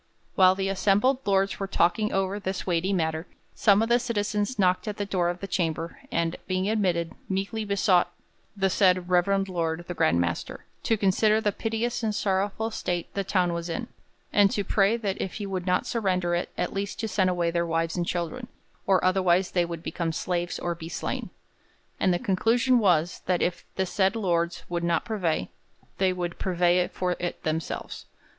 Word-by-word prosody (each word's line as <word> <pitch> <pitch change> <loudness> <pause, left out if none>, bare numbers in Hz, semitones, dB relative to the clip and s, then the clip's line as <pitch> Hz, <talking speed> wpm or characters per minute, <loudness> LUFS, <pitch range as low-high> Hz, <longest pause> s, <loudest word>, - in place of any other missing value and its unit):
While 185 -1 +6
the 195 0 -1
assembled 205 +7 +2
lords 195 0 +2
were 195 - -2
talking 195 +4 +2
over 195 +1 0
this 190 -1 -3
weighty 180 +1 0
matter, 160 -2 -1 0.3
some 205 0 +4
of 225 - -2
the 240 +1 +5
citizens 210 -1 -1
knocked 185 +1 +2
at 210 - -3
the 205 - -2
door 180 -3 0
of 175 0 -4
the 195 - -4
chamber 165 -3 -2
and, 170 0 0
being 185 +1 0
admitted, 180 -6 0 0.2
'meekly 195 +3 -2
besought 200 -3 +3 0.5
the 195 -1 +2
said 185 -2 +3
reverend 195 +2 +3
lord 170 -2 -2
the 175 - -3
Grand 85 - +2
Master 85 -1 -3 0.2
to 225 - +1
consider 210 +2 +3
the 210 -2 +1
piteous 225 +3 -2
and 215 -2 -1
sorrowful 200 +3 0
state 175 -5 -3
the 200 - -1
town 180 -2 +1
was 170 0 -4
in', 165 - -4 0.4
and 205 -1 +6
to 205 - -1
pray 200 +3 +2
that 205 -4 -3
if 190 - -3
he 210 - -5
would 190 -2 -4
not 180 - +2
surrender 185 -6 0
it, 175 - -1
at - - -1
least 200 0 -3
to 225 - -1
send 190 -3 +2
away 175 -2 0
their 170 0 0
wives 165 0 0
and 175 -1 -1
children, 180 +8 -3 0.4
or 190 -2 +3
otherwise 185 -1 +3
they 175 -2 +2
would 170 -1 -6
become 170 -2 -2
slaves 175 +2 -2
or 175 - -2
be 165 -1 -8
slain. - - -4 0.7
'And 185 - +3
the 175 - +2
conclusion 230 +7 +2
was, 175 -5 +2
that 180 -2 +2
if 175 -1 -2
the 190 - 0
said 190 +3 +1
lord 170 -5 0
would 170 -1 -2
not 170 -1 +1
purvey, 175 - -1 0.5
they 190 -1 +3
would 175 -1 -4
purvey 180 -1 +2
for 180 -1 -1
it 175 0 -4
themselves. 160 0 -4
185 Hz, 190 wpm, -26 LUFS, 175-200 Hz, 0.7 s, While